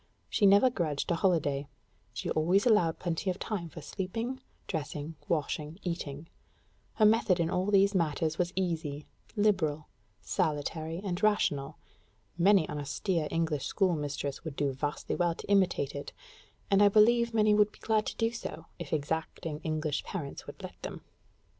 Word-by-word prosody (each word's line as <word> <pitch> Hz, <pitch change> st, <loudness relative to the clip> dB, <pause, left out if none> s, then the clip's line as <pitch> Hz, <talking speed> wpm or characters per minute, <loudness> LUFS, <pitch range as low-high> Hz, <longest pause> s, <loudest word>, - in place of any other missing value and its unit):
She 205 Hz, -, +4 dB
never 200 Hz, +6 st, +6 dB
grudged 165 Hz, -, -1 dB
a -, -, +3 dB
holiday; 145 Hz, -6 st, +1 dB, 0.4 s
she 115 Hz, -, -4 dB, 0.4 s
allowed 210 Hz, -9 st, +4 dB
plenty 175 Hz, +2 st, -2 dB
of 180 Hz, -, -1 dB
time 190 Hz, -7 st, -4 dB
for 160 Hz, -1 st, -10 dB
sleeping, 225 Hz, -, -4 dB, 0.2 s
dressing, 155 Hz, -1 st, -4 dB
washing, 155 Hz, 0 st, -2 dB
eating: 165 Hz, -4 st, -4 dB, 0.7 s
her 215 Hz, -, +4 dB
method 210 Hz, -4 st, +4 dB
in 165 Hz, 0 st, +1 dB
all 185 Hz, +2 st, 0 dB
these 200 Hz, 0 st, +4 dB
matters 160 Hz, -2 st, 0 dB
was 175 Hz, 0 st, +1 dB
easy, 160 Hz, -6 st, -2 dB, 0.3 s
liberal, 180 Hz, -8 st, +1 dB, 0.3 s
salutary, 155 Hz, -, -2 dB
and 185 Hz, -1 st, -3 dB
rational; 155 Hz, -9 st, +1 dB, 0.6 s
many 185 Hz, 0 st, +4 dB
an 150 Hz, -, -4 dB
austere 155 Hz, +3 st, -1 dB
English 160 Hz, -4 st, -1 dB
schoolmistress 150 Hz, -7 st, -1 dB
would 160 Hz, -4 st, -6 dB
do 140 Hz, -1 st, 0 dB
vastly 145 Hz, +2 st, -3 dB
well 175 Hz, -2 st, +1 dB
to -, -, -10 dB
imitate 185 Hz, -8 st, +2 dB
it 140 Hz, -, -6 dB, 0.6 s
and 195 Hz, 0 st, +5 dB
I 205 Hz, -, +7 dB
believe 235 Hz, +3 st, +5 dB
many 215 Hz, -1 st, +5 dB
would 210 Hz, 0 st, +4 dB
be -, -, -18 dB
glad 215 Hz, -1 st, +1 dB
to -, -, -3 dB
do 225 Hz, 0 st, +1 dB
so, 165 Hz, -9 st, -6 dB
if 170 Hz, -4 st, -7 dB
exacting 155 Hz, 0 st, -2 dB
English 155 Hz, -2 st, -2 dB
parents 150 Hz, -8 st, -6 dB
would -, -, -10 dB
let -, -, -9 dB
them. -, -, -6 dB
170 Hz, 155 wpm, -30 LUFS, 150-200 Hz, 0.7 s, I